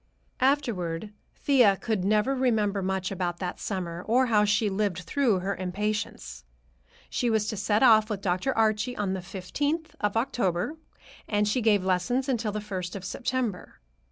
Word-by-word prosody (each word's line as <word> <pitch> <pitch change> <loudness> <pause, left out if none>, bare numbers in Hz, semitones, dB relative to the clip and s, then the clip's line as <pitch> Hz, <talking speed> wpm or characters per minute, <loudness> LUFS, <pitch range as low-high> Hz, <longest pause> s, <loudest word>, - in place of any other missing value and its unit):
Afterward 215 - 0 0.2
Thea 245 -9 +4
could 215 -4 -2
never 215 +6 +2
remember 220 -6 +1
much 190 0 -2
about 175 -2 -2
that 180 0 -4
summer, 175 -4 -4
or 250 +4 +4
how 210 -4 +3
she 210 +1 +2
lived 195 -3 -1
through 215 +1 +1
her 195 +2 -2
impatience. 185 - -3 0.6
She 245 - -1
was 220 -2 +2
to - - -3
set 205 +3 +1
off 220 -3 +6
with 210 -3 -2
Dr. 185 +6 0
Archie 220 +2 +1
on 200 -2 -1
the 190 - -3
fifteenth 285 - -3
of 210 +1 0
October, 225 - 0 0.5
and 210 -1 +1
she 225 +4 +1
gave 210 -4 +3
lessons 245 +9 +1
until 235 -5 0
the 210 - -3
first 185 -4 -5
of 195 -1 -6
September. 240 -2 -3
210 Hz, 160 wpm, -27 LUFS, 185-235 Hz, 0.6 s, off